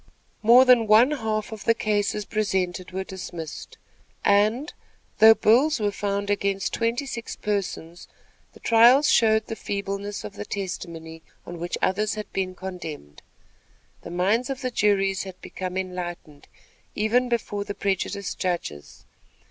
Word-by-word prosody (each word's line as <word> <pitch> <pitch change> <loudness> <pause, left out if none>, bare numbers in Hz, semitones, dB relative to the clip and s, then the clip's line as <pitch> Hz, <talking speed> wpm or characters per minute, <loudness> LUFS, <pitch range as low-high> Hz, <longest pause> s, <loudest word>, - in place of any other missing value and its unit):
More 240 +4 +7
than 245 -3 +5
one 225 +6 +6
half 220 -6 -2
of 220 -2 -8
the 230 - +4
cases 210 -1 -1
presented 190 -4 -2
were 190 +1 -4
dismissed; 175 -4 -8 0.5
and, 215 +8 +2 0.5
though 220 +1 +9
bills 255 +8 +3
were 205 -1 0
found 200 0 -2
against 200 -1 -1
twenty 235 +4 -1
six 235 -3 -6
persons, 180 -4 -4 0.5
the - - -16
trials 240 +6 +5
showed 220 -1 +4
the 225 - -5
feebleness 200 0 -4
of 205 - -7
the 205 - -6
testimony 170 -5 -6 0.2
on 175 -1 -8
which 175 +1 -3
others 210 +2 +1
had 215 -1 -7
been 185 -1 -2
condemned. 170 - -8 0.8
The - - -9
minds 200 +8 +1
of 270 0 -4
the 255 -1 -2
juries 195 -3 +1
had 190 -1 -9
become 185 0 -6
enlightened, 175 -5 -6 0.5
even 240 +4 +1
before 210 -4 -2
the 205 0 -6
prejudiced 200 0 -2
judges. 170 - -4
205 Hz, 140 wpm, -24 LUFS, 185-225 Hz, 0.8 s, though